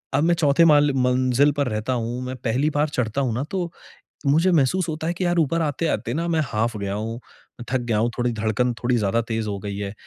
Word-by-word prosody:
अब 145 Hz, -, +2 dB
मैं 170 Hz, +1 st, +4 dB
चौथे 150 Hz, -1 st, +3 dB
माल 145 Hz, -2 st, +5 dB
मंजिल 130 Hz, +2 st, +3 dB
पर 140 Hz, -2 st, +1 dB
रहता 110 Hz, +4 st, -2 dB
हूँ, 120 Hz, +1 st, -3 dB
मैं 130 Hz, +1 st, -4 dB
पहली 125 Hz, +5 st, 0 dB
बार 145 Hz, +1 st, +1 dB
चढ़ता 125 Hz, 0 st, -1 dB
हूँ 125 Hz, -4 st, 0 dB
ना 125 Hz, -, -1 dB
तो 180 Hz, -3 st, -2 dB, 0.6 s
मुझे 160 Hz, +6 st, +4 dB
महसूस 170 Hz, +4 st, +2 dB
होता 160 Hz, 0 st, -3 dB
है 175 Hz, -, -1 dB
कि 185 Hz, -, -3 dB
यार 175 Hz, 0 st, +1 dB
ऊपर 165 Hz, +1 st, +1 dB
आते-आते 150 Hz, -5 st, -1 dB
ना 165 Hz, +2 st, -1 dB
मैं 160 Hz, -2 st, +1 dB
हाफ 115 Hz, +1 st, -1 dB
गया 100 Hz, 0 st, -3 dB
हूँ, 110 Hz, +2 st, -3 dB, 0.5 s
मैं 120 Hz, -, -6 dB
थक 130 Hz, -, +2 dB
गया 110 Hz, -3 st, +1 dB
हूँ, 115 Hz, +2 st, +1 dB
थोड़ी 120 Hz, 0 st, +1 dB
धड़कन 110 Hz, +3 st, 0 dB
थोड़ी 125 Hz, 0 st, +2 dB
ज़्यादा 105 Hz, +2 st, +1 dB
तेज़ 110 Hz, -1 st, -2 dB
हो 100 Hz, -1 st, -3 dB
गई 100 Hz, -1 st, -5 dB
है। 100 Hz, -1 st, -4 dB
130 Hz, 240 wpm, -23 LUFS, 115-155 Hz, 0.6 s, माल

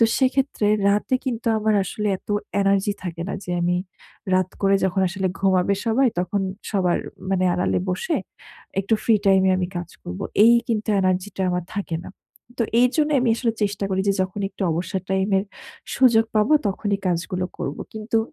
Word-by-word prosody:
তো 230 Hz, -, +7 dB
সেক্ষেত্রে 260 Hz, -5 st, +1 dB, 0.2 s
রাতে 205 Hz, +5 st, +1 dB
কিন্তু 235 Hz, -3 st, -3 dB
আমার 215 Hz, 0 st, +1 dB
আসলে 210 Hz, +3 st, -3 dB
এত -, -, -39 dB, 0.3 s
energy 195 Hz, +1 st, +2 dB
থাকে 170 Hz, -1 st, -4 dB
না -, -, -3 dB
যে, -, -, -6 dB
আমি 175 Hz, +1 st, +1 dB, 0.6 s
রাত 185 Hz, 0 st, +1 dB
করে 195 Hz, 0 st, +4 dB
যখন 190 Hz, 0 st, +1 dB
আসলে 190 Hz, +1 st, -2 dB
ঘুমাবে 190 Hz, 0 st, +2 dB
সবাই, 250 Hz, +4 st, +3 dB
তখন 185 Hz, +3 st, -1 dB, 0.3 s
সবার 185 Hz, -4 st, +1 dB, 0.3 s
মানে 185 Hz, -1 st, +2 dB
আড়ালে 180 Hz, -, +1 dB
বসে 325 Hz, -, -1 dB, 0.6 s
একটু 200 Hz, +3 st, +1 dB
free 220 Hz, -3 st, +4 dB
time 190 Hz, -1 st, +5 dB
এ -, -, +4 dB
আমি 180 Hz, -, 0 dB
কাজ 175 Hz, -1 st, -4 dB
করব। 90 Hz, +1 st, -7 dB, 0.2 s
এই 235 Hz, +1 st, +7 dB
কিন্তু 220 Hz, -2 st, -1 dB
energy 185 Hz, +1 st, +1 dB
টা 190 Hz, -, -1 dB
আমার 180 Hz, -1 st, -1 dB
থাকে 190 Hz, -5 st, -2 dB
না। -, -, -8 dB, 0.5 s
তো 235 Hz, -, +3 dB, 0.2 s
এইজন্য 295 Hz, +5 st, +2 dB
আমি 245 Hz, -2 st, +2 dB
আসলে 230 Hz, -2 st, 0 dB
চেষ্টা 200 Hz, -1 st, -1 dB
করি। 190 Hz, 0 st, +1 dB
যে 200 Hz, -, +4 dB
যখন 185 Hz, +2 st, -4 dB
একটু 200 Hz, -, -7 dB
অবসর 180 Hz, +3 st, -2 dB
time 190 Hz, +1 st, +1 dB
এর 190 Hz, -, -2 dB, 0.5 s
সুযোগ 235 Hz, -4 st, +5 dB
পাবো 215 Hz, +7 st, +3 dB, 0.2 s
তখনই 200 Hz, +1 st, -1 dB
কাজগুলো 180 Hz, +1 st, -1 dB
করব। 140 Hz, -, -3 dB, 0.2 s
কিন্তু 220 Hz, +1 st, -1 dB
195 Hz, 180 wpm, -23 LUFS, 185-225 Hz, 0.6 s, তো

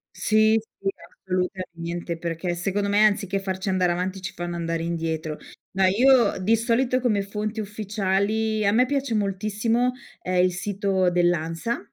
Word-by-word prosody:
Sì, 215 Hz, 0 st, +3 dB, 0.2 s
sì 195 Hz, -, -1 dB, 0.2 s
assolutamente. 175 Hz, -2 st, -4 dB
Perché 170 Hz, +1 st, -3 dB
secondo 200 Hz, +3 st, -1 dB
me 205 Hz, +1 st, +5 dB
anziché 200 Hz, -2 st, +1 dB
farci 190 Hz, 0 st, -3 dB
andare 185 Hz, -2 st, +2 dB
avanti 185 Hz, +2 st, -3 dB
ci 185 Hz, -, -5 dB
fanno 175 Hz, 0 st, -4 dB
andare 165 Hz, -1 st, -2 dB
indietro. 160 Hz, -2 st, -3 dB, 0.4 s
No, 190 Hz, 0 st, +3 dB
io 245 Hz, +6 st, +4 dB
di 220 Hz, +5 st, +3 dB
solito 245 Hz, +3 st, +1 dB
come 215 Hz, -5 st, +1 dB
fonti 210 Hz, +2 st, -3 dB
ufficiali 210 Hz, +1 st, -1 dB
a 200 Hz, -, +3 dB
me 245 Hz, +3 st, +4 dB
piace 275 Hz, -2 st, -1 dB
moltissimo, 215 Hz, +4 st, 0 dB, 0.3 s
ehm, 180 Hz, 0 st, +2 dB
il 185 Hz, -, +3 dB
sito 190 Hz, 0 st, 0 dB
dell'ANSA, 175 Hz, +4 st, 0 dB
195 Hz, 145 wpm, -24 LUFS, 180-215 Hz, 0.4 s, me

